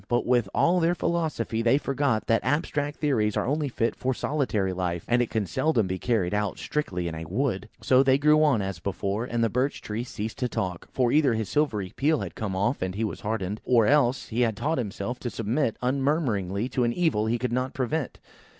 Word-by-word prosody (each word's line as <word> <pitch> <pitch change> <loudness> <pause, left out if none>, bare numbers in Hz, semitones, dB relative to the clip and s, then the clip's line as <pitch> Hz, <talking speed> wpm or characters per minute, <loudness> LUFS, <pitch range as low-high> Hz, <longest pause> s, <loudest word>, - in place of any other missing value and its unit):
But, 120 0 +1
with 120 -5 +2
all 180 +2 +3
their 170 +1 +2
philosophy, 160 -11 -1
they 120 +3 +4
forgot 140 -5 0
that 115 - +2
abstract 145 +2 -1
theories 115 -9 +1
are - - 0
only 145 +2 0
fit 115 -2 -1
for 130 0 -1
solitary 110 -12 -1
life, 90 -2 -2
and 120 -1 +2
can 110 -2 -1
seldom 115 - +1
be 95 0 -3
carried 105 -7 0
out 105 -1 -1
strictly 90 - -2
in 85 - -4
a 80 0 -6
wood. 110 - -2
So 130 0 +5
they 135 -1 +4
grew 150 +2 +4
on, 130 -9 +3
as 95 -3 -4
before, 100 +4 -2
and 120 -1 -1
the - - +4
Birch 125 +6 0
tree 110 +2 -4
ceased 110 -2 -6
to 125 - 0
talk, 90 -5 -3
for 125 -2 +1
either 145 -6 +4
his 110 -2 -3
silver 140 -10 0
peel 150 - +1
had - - -4
all - - -32
come 100 -4 -3
off, 110 +8 0
and 95 0 -2
he 110 - -1
was 110 - -3
hardened; 105 -1 -3
or 120 -3 +4
else, 135 -1 +2
he 120 +2 -1
had 115 -4 +1
taught 155 -1 0
himself 115 +2 -4
to 120 - -3
submit 115 +3 -1
unmurmuringly 125 - 0
to 125 - 0
an 120 0 +1
evil 155 -11 +1
he 115 +2 +1
could 120 0 -2
not 125 +1 -1
prevent. 135 +3 -2
120 Hz, 220 wpm, -26 LUFS, 105-140 Hz, -, So